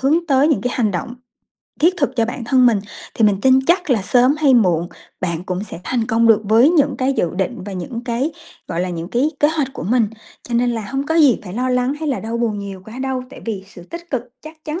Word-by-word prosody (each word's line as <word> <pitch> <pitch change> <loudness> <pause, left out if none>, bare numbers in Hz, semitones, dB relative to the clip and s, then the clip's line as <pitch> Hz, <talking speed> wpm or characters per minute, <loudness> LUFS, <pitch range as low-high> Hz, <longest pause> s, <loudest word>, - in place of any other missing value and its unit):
hướng 315 +6 +2
tới 275 +1 +4
những 305 - +2
cái 250 0 -2
hành 225 -4 +1
động 195 +6 -4 0.7
thiết 345 +4 +4
thực 280 -5 -1
cho 230 - +3
bản 235 +1 -5
thân 255 +1 +4
mình. 225 -4 +3 0.3
Thì 225 - +2
mình 205 -2 +3
tin 260 0 +5
chắc 350 -2 +2
là 225 -6 +2
sớm 250 +6 +3
hay 285 -4 +4
muộn 175 -7 +2 0.3
bạn 170 -2 -3
cũng 185 +2 -3
sẽ 190 - -9
thành 235 -3 -1
công 230 +1 +2
được 225 -2 +5
với 225 +6 +5
những 290 -5 +2
cái 265 +1 +1
dự 175 -10 0
định 195 +5 -2
và 200 - -6
những 230 +6 -6
cái, 255 +6 -1 0.4
gọi 170 0 -2
là, 185 - -1
những 170 0 -5
cái 255 +8 +1
kế 295 - +5
hoạch 305 -4 -1
của - - -7
mình. 225 +4 +2 0.3
Cho 240 - -6
nên 245 +1 +2
là 230 -2 -3
hông 270 +2 -2
có 320 - 0
gì 295 -7 +5
phải 180 - -8
lo 250 +3 -1
lắng 250 +2 +1
hay 315 - -2
là 270 - -1
đau 225 +1 -4
buồn 225 -3 -1
nhiều 195 -2 -7
quá 220 +4 -10
đâu, 265 -1 -2
tại - - -11
vì 205 -4 -4
sự 190 -3 -13
tích 340 - -10
cực 260 -4 -1 0.2
chắc 310 0 -13
chắn 310 +3 -4
245 Hz, 265 wpm, -19 LUFS, 210-275 Hz, 0.7 s, tin